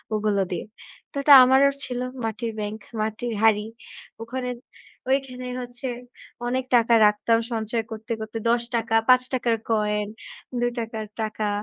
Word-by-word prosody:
ওগুলো 210 -2 +1
দিয়ে। 175 - -3 0.5
তো - - -19
এটা 290 - +8
আমারও 265 +2 +5
ছিল 250 -1 -4 0.3
মাটির 225 +1 -3
ব্যাংক, 210 +1 -4 0.2
মাটির 220 +2 -3
হাড়ি। 215 -1 +4 0.6
ওখানে 250 +2 -4 0.6
ওইখানে 255 -2 -1
হচ্ছে 245 +1 -7 0.6
অনেক 255 +1 -1
টাকা 235 0 +4
রাখতাম 220 +2 +2
সঞ্চয় 225 +1 -2
করতে, 220 +2 -7
করতে 220 +1 -5
৳১০ 235 -1 0
৳৫ 255 -1 +3
র - - -6
কয়েন, 210 -1 +1 0.5
৳২ 235 -2 -2
র - - -18
টাকা। 215 -1 -2
230 Hz, 135 wpm, -24 LUFS, 215-250 Hz, 0.6 s, এটা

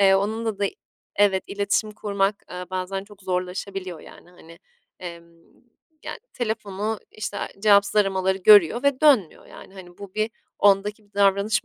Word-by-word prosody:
Eee, 195 -1 +6
onunla 215 +2 -1
da 200 - +1 0.5
evet, 195 -2 +3
iletişim 200 +1 -1
kurmak, 200 -1 -1
eee, 180 0 -6
bazen 185 +1 -3
çok 205 -1 -17
zorlaşabiliyor 185 -1 -4
yani, 175 - -15
hani, 165 -1 -16 0.4
emm, 170 -2 -8 0.8
yani - - -6
telefonu, 215 -2 -3
işte, 215 -1 -5 0.2
cevapsız 200 -1 +4
aramaları 190 -2 +2
görüyor 205 - +6
ve 280 -2 +1
dönmüyor 265 - +3
yani, 195 - -14
hani, 175 -2 -13
bu 200 -2 -10
bir 215 +1 0 0.3
ondaki 205 +2 +2
bir 205 - -31
davranış 200 +3 +2
200 Hz, 145 wpm, -24 LUFS, 190-210 Hz, 0.8 s, Eee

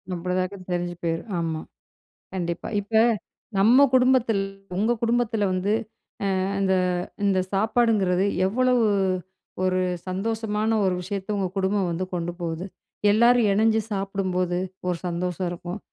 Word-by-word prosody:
அப்படிதாங்க 185 +2 -2
தெரிஞ்சு 175 0 -2
போயிடும் 165 +6 -2
ஆமா. 160 -1 -2 0.7
கண்டிப்பா. 170 -3 -3
இப்ப 205 +3 -15 0.6
நம்ம 230 +8 +6
குடும்பத்தில 255 -3 +4 0.4
உங்க 220 +4 +2
குடும்பத்தில 230 -2 +1
வந்து 185 +3 0 0.9
இந்த 190 -1 +2 0.5
இந்த 195 -2 +3
சாப்பாடுங்கிறது, 200 -3 +2 0.2
எவ்வளவு 250 +2 +2 0.8
ஒரு 185 0 +2 0.3
சந்தோஷமான 215 +2 -1 0.2
ஒரு 185 - +2
விஷயத்த 200 +2 -3
உங்க 195 -2 0
குடும்பம் 190 -1 +1
வந்து 175 +3 -2
கொண்டு 175 0 -2
போகுது? 170 +1 -3 0.5
எல்லாரும் 235 0 +5
இணஞ்சு 220 +2 +3
சாப்பிடும்போது, 190 -3 -1 0.3
ஒரு 180 -1 0
சந்தோஷம் 180 +1 -2
இருக்கும். 175 +3 -6
195 Hz, 115 wpm, -25 LUFS, 180-220 Hz, 0.9 s, நம்ம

